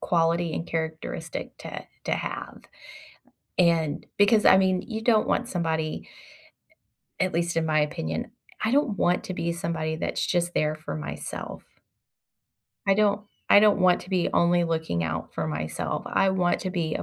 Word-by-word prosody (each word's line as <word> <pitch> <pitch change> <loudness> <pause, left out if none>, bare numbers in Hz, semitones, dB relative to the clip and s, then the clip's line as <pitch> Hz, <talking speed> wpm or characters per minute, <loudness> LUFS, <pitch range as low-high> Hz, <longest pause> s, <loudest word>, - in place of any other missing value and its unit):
quality 170 -1 +1
and - - -3
characteristic 160 -1 -4
to - - -7 0.2
to - - -1
have. - - -4 1.0
And 165 -4 +2
because, 210 +1 +5
I 190 - +8
mean, 185 -1 +2
you 220 -2 -5
don't 225 -2 +3
want 245 - 0
somebody 160 -3 -2 1.1
at 185 0 +1
least 170 0 0
in 160 - +1
my 155 -1 +3
opinion, 80 - -2 0.3
I 220 - +2
don't 265 -7 +2
want 180 +1 +1
to 185 - -4
be 170 0 -1
somebody 160 -2 -2
that's - - -2
just 175 -1 0
there 155 0 +1
for 155 - -6
myself. 150 - -6 1.2
I 195 - +5
don't 205 0 +2 0.3
I - - +8
don't 210 -1 +5
want 180 -1 +4
to 185 - -13
be 180 -2 +2
only 175 0 +3
looking 160 - -1
out 80 0 -4
for 80 -1 -2
myself, 75 +1 -3
I 195 - +2
want 180 -2 +1
to 185 - -3
be 165 -4 -1
a - - -2
170 Hz, 165 wpm, -26 LUFS, 160-190 Hz, 1.2 s, I